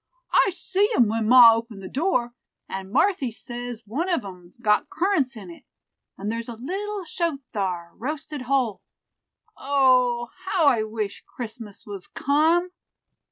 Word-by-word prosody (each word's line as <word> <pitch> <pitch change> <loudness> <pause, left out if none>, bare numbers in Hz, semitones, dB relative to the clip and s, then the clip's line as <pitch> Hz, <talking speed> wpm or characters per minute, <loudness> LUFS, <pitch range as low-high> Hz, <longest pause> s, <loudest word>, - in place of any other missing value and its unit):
I - - +5
see 385 +3 0
'em 240 - +5
when 220 0 -1
ma 240 -1 +9
opened 225 -3 -5
the - - -6
door; 255 - 0 0.3
and 190 0 -6
Marthy 290 - +2
says 240 0 -7
one 290 - -2
of 335 - 0
'em 180 -2 -11
got 210 -3 +2
currants 315 - 0
in 190 -5 -9
it, 170 - -14 0.5
and 205 +2 -3
there's 230 +1 -4
a 235 - -6
little 390 - -4
shoat 335 -4 -2
thar 180 -4 -2
roasted 300 +2 -5
whole. 255 -7 +1 0.7
O! 255 -3 +2
how 360 -4 +2
I 245 -6 +5
wish 215 -2 -4
Christmas 225 -3 -8
was 200 -3 -8
come." 325 +6 +2
245 Hz, 150 wpm, -24 LUFS, 215-305 Hz, 0.7 s, ma